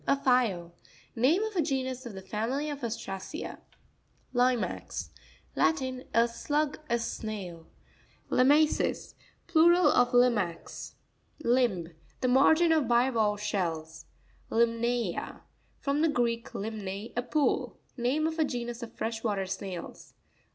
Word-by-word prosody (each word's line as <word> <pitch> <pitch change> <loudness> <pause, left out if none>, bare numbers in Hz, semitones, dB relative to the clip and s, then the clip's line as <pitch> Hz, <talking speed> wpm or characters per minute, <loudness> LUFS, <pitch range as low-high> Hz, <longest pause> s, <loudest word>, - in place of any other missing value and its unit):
A 275 - +4
file. 230 -11 +1 0.4
Name 285 - +3
of 440 -2 -4
a 345 - +3
genus 260 -3 -2
of 230 - -8
the 190 -1 -8
family 245 +10 -2
of 285 -2 -7
Ostracea. 225 - -5 0.7
Li'max.—Latin. 255 +2 -1
A 230 +1 +4
slug,a 290 +1 -1
snail. 200 -7 -5 0.3
| - - -33
Lima'ces.—Plural 315 +4 +3
of 245 0 +3
limax. 230 -9 +1 0.5
Lims.—The 195 - 0
margin 315 +6 +5
of 310 -6 +3
bivalve 230 -4 +2
shells. 160 -6 -3 0.4
Limna'a.—From 235 - -1
the 325 - +4
Greek, 235 -4 0
limne, 205 0 -5
a 245 - +1
pool. 285 +4 0 0.2
Name 265 +5 0
of 320 0 -2
a - - +5
genus 240 -3 -4
of 235 - -7
fresh 225 0 -3
water 200 -4 0
snails. 190 -2 -7
240 Hz, 110 wpm, -29 LUFS, 210-275 Hz, 0.7 s, margin